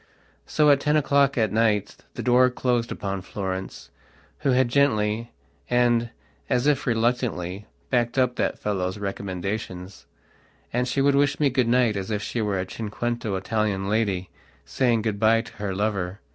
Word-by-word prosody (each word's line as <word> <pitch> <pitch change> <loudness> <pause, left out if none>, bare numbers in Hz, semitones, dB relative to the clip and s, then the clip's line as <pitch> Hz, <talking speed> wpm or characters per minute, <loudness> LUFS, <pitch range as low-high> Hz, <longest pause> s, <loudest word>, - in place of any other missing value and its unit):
So 150 -1 +4
at 140 - +4
ten 150 +2 +2
o'clock 140 -2 +2
at 110 -4 +2
night 110 -2 +1 0.2
the - - -4
door 125 +1 +5
closed 125 -2 -1
upon 95 -1 -3
Florence, 95 0 -5 0.5
who 145 - 0
had 130 -1 +3
gently, 115 -4 +1 0.4
and, 120 -1 +2 0.4
as 125 +1 +1
if 145 -1 +1
reluctantly, 115 -5 -1 0.2
backed 120 -1 +1
up 125 -1 +2
that - - -1
fellow's 95 -2 -2
recommendations; 95 -1 -5 0.7
and 125 +1 +1
she 135 +2 0
would 140 +1 +4
wish 145 +1 +2
me 145 -3 +3
good 125 -2 +1
night 120 -2 +3
as 95 0 -4
if 105 -1 -2
she 120 - -2
were 100 -3 -1
a 95 - -2
cinquecento 115 +1 -3
Italian 100 0 -1
lady 100 -4 0 0.3
saying 120 -4 +1
good 110 -2 -2
bye 115 +1 +4
to 115 - -13
her 100 -2 -3
lover. 100 -2 -2
115 Hz, 160 wpm, -24 LUFS, 100-125 Hz, 0.7 s, door